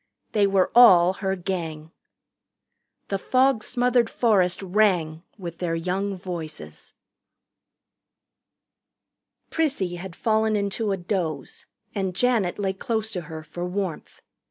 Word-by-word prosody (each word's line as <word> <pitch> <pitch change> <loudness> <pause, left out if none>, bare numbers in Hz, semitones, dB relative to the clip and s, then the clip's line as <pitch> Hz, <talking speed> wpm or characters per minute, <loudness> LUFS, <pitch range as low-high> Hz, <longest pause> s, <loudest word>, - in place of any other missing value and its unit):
They 205 -2 +3
were 195 -2 +2
all 185 -7 +7
her 190 0 -2
Gang. 165 -4 -5 1.2
The 195 - -1
fog 255 0 +2
smothered 245 -2 +1
forest 195 -6 +2
rang 180 -5 +1 0.2
with 170 -4 -7
their 170 -2 -1
young 190 +4 -2
voices. 170 -4 -8 2.6
Prissy 265 - 0
had 180 -1 -8
fallen 220 -1 +1
into 205 +1 -1
a 195 - 0
doze, 175 -6 -4 0.3
and 190 -4 -2
Janet 230 -6 +1
lay 195 -2 -1
close 220 +1 -2
to 180 - -3
her 160 -1 -8
for 160 +3 -7
warmth. 180 -2 -4
190 Hz, 115 wpm, -24 LUFS, 175-215 Hz, 2.6 s, all